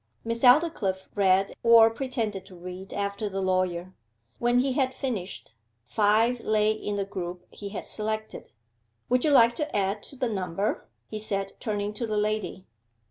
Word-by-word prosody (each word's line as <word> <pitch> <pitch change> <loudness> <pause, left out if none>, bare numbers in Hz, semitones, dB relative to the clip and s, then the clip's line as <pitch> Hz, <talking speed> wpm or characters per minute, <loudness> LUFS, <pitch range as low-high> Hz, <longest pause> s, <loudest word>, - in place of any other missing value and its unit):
Miss 230 0 -2
Aldclyffe 245 - +3
read, 195 -1 +3
or 230 -1 +7
pretended 225 -6 -3
to 185 - -13
read 180 +2 -8
after 200 +1 -2
the 195 0 -3
lawyer. 185 -1 0 0.5
When 240 +1 +2
he 265 +2 +2
had 260 -1 0
finished, 205 - -4 0.3
five 215 - +3
lay 215 -1 +2
in 210 -1 -3
the 200 -1 -1
group 180 -2 -6
he 200 - -7
had 200 - -6
selected. 215 0 -4 0.6
'Would 250 0 +3
you 310 - +3
like 235 -4 +6
to 300 0 -3
add 200 +1 0
to 275 - -12
the 255 -1 -1
number?' 195 -1 -2 0.2
he 215 - -5
said, 195 -2 -2
turning 205 -1 -2
to 225 +2 -3
the 215 -1 -1
lady. 210 -3 -1
210 Hz, 165 wpm, -27 LUFS, 195-230 Hz, 0.6 s, or